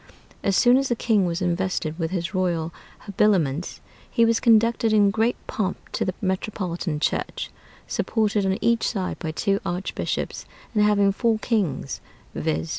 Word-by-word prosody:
As 195 -1 +2
soon 245 +1 +6
as 275 0 0
the 240 - +2
king 215 -5 +2
was 170 +2 -2
invested 175 -2 -1
with 165 -1 -1
his 180 +1 -3
royal 170 -3 0 0.3
habiliments, 180 -7 +1 0.3
he 230 - +3
was 230 0 +3
conducted 230 0 +3
in 205 -2 +5
great 225 +3 +1
pomp 190 -3 -2
to - - -1
the 185 - -2
metropolitan 185 -4 -2
church, - - -2 0.3
supported 215 -2 0
on 190 0 +1
each 230 +1 +2
side 190 -5 -3
by 160 - -4
two 195 +5 0
archbishops, 180 0 -3 0.3
and 210 - +2
having 205 -1 +4
four 225 +2 +1
kings, 195 - -1 0.3
viz. 80 +1 -2
195 Hz, 155 wpm, -24 LUFS, 175-220 Hz, 0.3 s, soon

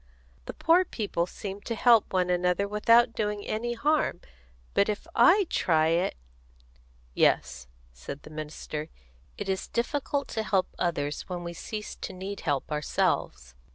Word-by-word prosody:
The - - -6
poor 340 +3 +4
people 205 - -2
seem 200 +1 -7
to 230 - -4
help 230 -1 +5
one 180 -1 +1
another 180 +2 +1
without 230 +3 +4
doing 210 -1 -2
any 240 +2 -2
harm, 295 - +1 0.5
but 200 - +3
if 210 - -3
I 390 +3 +6
try 160 - +2
it 170 +3 +1 0.5
" - - -31 0.3
"Yes," 60 0 +1 0.3
said 100 - -8
the 155 - -12
minister, 155 0 -6 0.5
"it - - -5
is 190 -1 -2
difficult 280 +3 -1
to 220 - -2
help 195 -4 +1
others 145 -3 -2
when 175 -1 -4
we 170 0 -5
cease 210 +5 -6
to - - -6
need 195 +2 -6
help 145 -3 -2
ourselves. 65 - -1
190 Hz, 155 wpm, -28 LUFS, 155-225 Hz, 0.5 s, I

